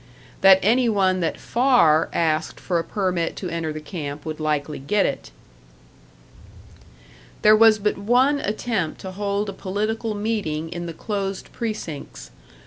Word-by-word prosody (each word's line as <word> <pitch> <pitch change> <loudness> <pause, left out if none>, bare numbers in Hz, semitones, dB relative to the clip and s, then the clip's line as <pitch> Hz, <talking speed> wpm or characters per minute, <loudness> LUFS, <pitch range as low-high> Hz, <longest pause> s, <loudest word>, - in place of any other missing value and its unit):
That 195 -1 +8
any 235 +4 +3
one 190 -3 +2
that 165 -2 -2
Farr 235 - +3
asked 160 -1 -1
for 175 -3 -1
a - - -2
permit 180 -2 -1
to 185 - -5
enter 165 -2 -3
the 155 - -5
camp 150 -2 -6
would 155 -1 -5
likely 150 -1 -2
get 195 +10 +1
it.... - - -3 2.1
"There 215 0 +7
was 220 0 +6
but 210 -1 -1
one 250 +7 +3
attempt 210 - -2
to 190 - -6
hold 200 +1 -2
a 200 - -4
political 215 +3 -3
meeting 205 -8 -2
in 175 0 -5
the 165 - -6
closed 195 0 -4
precincts. 210 -10 -6
195 Hz, 145 wpm, -23 LUFS, 160-215 Hz, 2.1 s, That